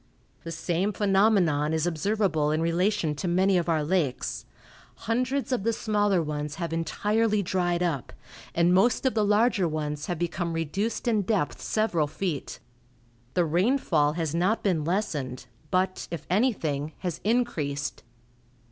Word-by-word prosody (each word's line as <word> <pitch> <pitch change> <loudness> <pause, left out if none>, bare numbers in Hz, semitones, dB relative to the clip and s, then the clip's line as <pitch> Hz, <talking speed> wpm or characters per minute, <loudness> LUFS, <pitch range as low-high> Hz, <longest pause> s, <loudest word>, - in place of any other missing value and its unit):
The 165 - -6
same 175 +4 -1
phenomenon 195 -8 +3
is 160 0 +1
observable 175 -2 +1
in 155 +1 +1
relation 170 0 +1
to 150 +5 -4
many 185 +3 +3
of 175 -1 +1
our 160 -2 +2
lakes. 150 -5 -1 0.5
Hundreds 255 +5 -1
of 250 - +1
the 230 +3 +1
smaller 205 -5 +1
ones 150 -1 -4
have 170 -2 -4
entirely 210 +5 +1
dried 175 -1 0
up, 155 -8 -2 0.4
and 170 +1 +4
most 220 +7 +3
of 260 - +3
the 215 - +2
larger 210 -2 +3
ones 150 -1 -3
have 175 - -2
become 170 0 -2
reduced 190 +10 -2
in 220 -3 +3
depth 180 - -1
several 175 -7 0
feet. 160 -2 -4 0.8
The 175 - +3
rainfall 170 - +2
has 160 -2 -2
not 185 +7 +1
been 175 -7 +1
lessened, 150 - -2 0.2
but, 185 0 0
if 170 - -6
anything, 160 - 0
has 180 -4 -3
increased. 150 - -1
175 Hz, 145 wpm, -27 LUFS, 155-210 Hz, 0.8 s, and